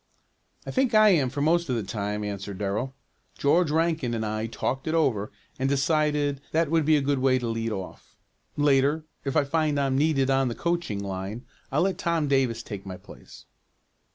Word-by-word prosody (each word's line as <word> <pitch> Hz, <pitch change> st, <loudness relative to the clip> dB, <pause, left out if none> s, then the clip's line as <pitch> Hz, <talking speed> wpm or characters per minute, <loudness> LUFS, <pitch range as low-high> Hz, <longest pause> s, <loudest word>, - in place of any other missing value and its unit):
"I -, -, -4 dB
think 260 Hz, -4 st, +1 dB
I 215 Hz, 0 st, +7 dB
am 150 Hz, -9 st, +3 dB
for 140 Hz, +3 st, -4 dB
most 170 Hz, +1 st, +2 dB
of 125 Hz, -, +1 dB
the 115 Hz, -, -1 dB
time," 105 Hz, +1 st, -3 dB
answered 100 Hz, -1 st, -5 dB
Darrell. 105 Hz, +7 st, -2 dB, 0.4 s
"George 165 Hz, +3 st, +3 dB
Rankin 160 Hz, -6 st, 0 dB
and 110 Hz, -1 st, -2 dB
I 110 Hz, +1 st, -2 dB
talked 130 Hz, +4 st, -3 dB
it 160 Hz, -, 0 dB
over 115 Hz, -10 st, +1 dB, 0.3 s
and 135 Hz, +1 st, +1 dB
decided 145 Hz, 0 st, +1 dB
that 160 Hz, -1 st, +1 dB
would 165 Hz, -2 st, +2 dB
be 155 Hz, 0 st, +5 dB
a -, -, +1 dB
good 140 Hz, -1 st, +1 dB
way 130 Hz, 0 st, +3 dB
to 125 Hz, -2 st, -3 dB
lead 115 Hz, 0 st, -2 dB
off. 95 Hz, -3 st, -7 dB, 0.4 s
Later, 145 Hz, +1 st, +3 dB, 0.2 s
if 135 Hz, +2 st, 0 dB
I 150 Hz, -, +4 dB
find 150 Hz, 0 st, 0 dB
I'm 135 Hz, -1 st, +1 dB
needed 140 Hz, -3 st, +2 dB
on 135 Hz, 0 st, +2 dB
the 120 Hz, -, -3 dB
coaching 170 Hz, -13 st, -2 dB
line, 100 Hz, +4 st, -5 dB, 0.3 s
I'll 145 Hz, +5 st, +2 dB
let 195 Hz, 0 st, -1 dB
Tom 170 Hz, -5 st, 0 dB
Davis 130 Hz, -5 st, +1 dB
take 100 Hz, -3 st, -7 dB
my 95 Hz, -2 st, -7 dB
place." -, -, -14 dB
135 Hz, 195 wpm, -26 LUFS, 115-155 Hz, 0.4 s, I